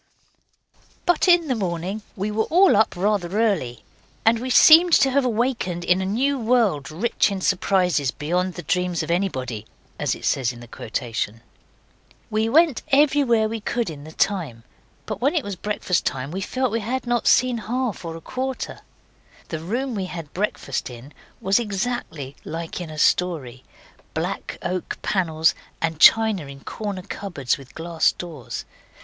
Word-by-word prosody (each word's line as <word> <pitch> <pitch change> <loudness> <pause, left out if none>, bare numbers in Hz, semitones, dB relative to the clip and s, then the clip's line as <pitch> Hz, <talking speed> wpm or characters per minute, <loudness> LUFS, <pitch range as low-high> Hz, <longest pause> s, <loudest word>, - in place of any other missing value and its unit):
But 350 +1 +3
in 345 -2 +5
the 260 - +1
morning 190 -1 -3
we 205 +2 -2
were 220 +1 0
all 365 - +5
up 220 -1 +3
rather 195 0 0
early, 175 - 0 0.4
and 225 +1 +4
we 255 +2 -4
seemed 330 +6 +8
to 270 - +5
have 280 +1 +3
awakened 230 -7 -1
in 180 +2 +2
a 190 - -2
new 265 +7 +1
world 220 - +2
rich 205 +10 +1
in 200 -1 -3
surprises 180 -6 +1
beyond 175 +7 -1
the 175 - -6
dreams 180 -1 0
of - - -3
anybody, 130 - -2 0.3
as - - 0
it - - -9
says 130 -2 +1
in 120 - -11
the 120 - -11
quotation. 115 -1 -4 0.9
We 220 +1 +1
went 310 -1 +4
everywhere 275 -6 +3
we 225 +1 -4
could 235 -2 -2
in 145 -2 -10
the 155 - -10
time, 160 - -1 0.4
but 215 -2 -5
when 280 +6 +2
it 315 - +1
was 205 -1 -5
breakfast 195 -2 -1
time 135 +1 -3
we 190 +3 -4
felt 255 +4 -1
we 230 - 0
had 250 +5 -3
not 240 -1 0
seen 250 -2 +4
half 235 -1 -2
or 165 -1 -5
a - - -12
quarter. 260 +4 -4 0.7
The 160 - -3
room 240 +10 -2
we 195 -4 -2
had 165 -5 -8
breakfast 180 -10 -2
in 125 +4 -11 0.3
was 195 +4 +2
exactly 195 - -3
like 165 +2 -5
in 170 - -6
a 155 - -8
story 150 -8 +1 0.5
black - - -3
oak 180 0 -3
panels 160 -5 +2 0.3
and 160 -2 -2
china 220 -8 +5
in 135 0 -11
corner 200 0 -5
cupboards 175 -11 -3
with 135 -1 -15
glass 165 0 +1
doors. 160 -9 -7
190 Hz, 165 wpm, -23 LUFS, 160-235 Hz, 0.9 s, seemed